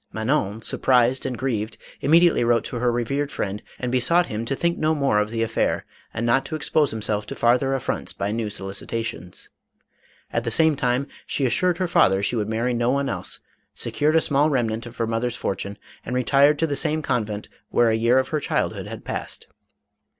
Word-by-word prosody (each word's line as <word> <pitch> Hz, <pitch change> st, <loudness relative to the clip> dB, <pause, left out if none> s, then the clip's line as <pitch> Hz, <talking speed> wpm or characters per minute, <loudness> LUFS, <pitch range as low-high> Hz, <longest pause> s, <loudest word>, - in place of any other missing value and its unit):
Manon 110 Hz, -2 st, -1 dB
surprised 125 Hz, +2 st, +2 dB
and 125 Hz, -2 st, -4 dB
grieved, 115 Hz, -4 st, -2 dB, 0.2 s
immediately 165 Hz, 0 st, +4 dB
wrote 115 Hz, -1 st, +3 dB
to 125 Hz, -, -5 dB
her 120 Hz, +1 st, +1 dB
revered 140 Hz, +5 st, -1 dB
friend 100 Hz, +1 st, -3 dB, 0.2 s
and 125 Hz, -1 st, -3 dB
besought 130 Hz, +8 st, +3 dB
him 110 Hz, -1 st, -4 dB
to 135 Hz, -, -1 dB
think 170 Hz, +4 st, 0 dB
no 155 Hz, 0 st, +2 dB
more 140 Hz, -8 st, +2 dB
of 105 Hz, 0 st, 0 dB
the 115 Hz, 0 st, -1 dB
affair, 115 Hz, -, 0 dB, 0.3 s
and 115 Hz, -, -3 dB
not 125 Hz, +3 st, +3 dB
to 155 Hz, -, -4 dB
expose 150 Hz, -1 st, +2 dB
himself 105 Hz, -1 st, -2 dB
to -, -, -6 dB
farther 125 Hz, +3 st, +2 dB
affronts 130 Hz, -, -3 dB
by 100 Hz, +1 st, -3 dB
new 110 Hz, -1 st, -2 dB
solicitations. 95 Hz, -2 st, -5 dB, 0.8 s
At 115 Hz, -, 0 dB
the 115 Hz, -, -1 dB
same 160 Hz, +6 st, +3 dB
time 125 Hz, 0 st, 0 dB, 0.2 s
she 140 Hz, -, 0 dB
assured 175 Hz, +7 st, +1 dB
her 185 Hz, -1 st, 0 dB
father 95 Hz, -, +3 dB
she 120 Hz, -, +1 dB
would 110 Hz, -2 st, -1 dB
marry 115 Hz, +3 st, 0 dB
no 120 Hz, 0 st, +1 dB
one 140 Hz, +1 st, +1 dB
else; -, -, -5 dB, 0.3 s
secured 150 Hz, +2 st, 0 dB
a 160 Hz, -, +5 dB
small 145 Hz, +1 st, +2 dB
remnant 115 Hz, -4 st, -1 dB
of 120 Hz, -, -12 dB
her 115 Hz, -, 0 dB
mother's 115 Hz, +1 st, -1 dB
fortune 100 Hz, +1 st, -3 dB, 0.3 s
and 125 Hz, -, -4 dB
retired 140 Hz, +3 st, +4 dB
to 165 Hz, -, +1 dB
the 145 Hz, -3 st, -2 dB
same 155 Hz, +1 st, 0 dB
convent 110 Hz, -6 st, -2 dB, 0.2 s
where 120 Hz, -1 st, +3 dB
a 110 Hz, -, +1 dB
}7ear 120 Hz, +3 st, +4 dB
of 130 Hz, -, -1 dB
her 155 Hz, -, 0 dB
childhood -, -, -2 dB
had -, -, -8 dB
passed. -, -, -5 dB
120 Hz, 200 wpm, -23 LUFS, 110-140 Hz, 0.8 s, a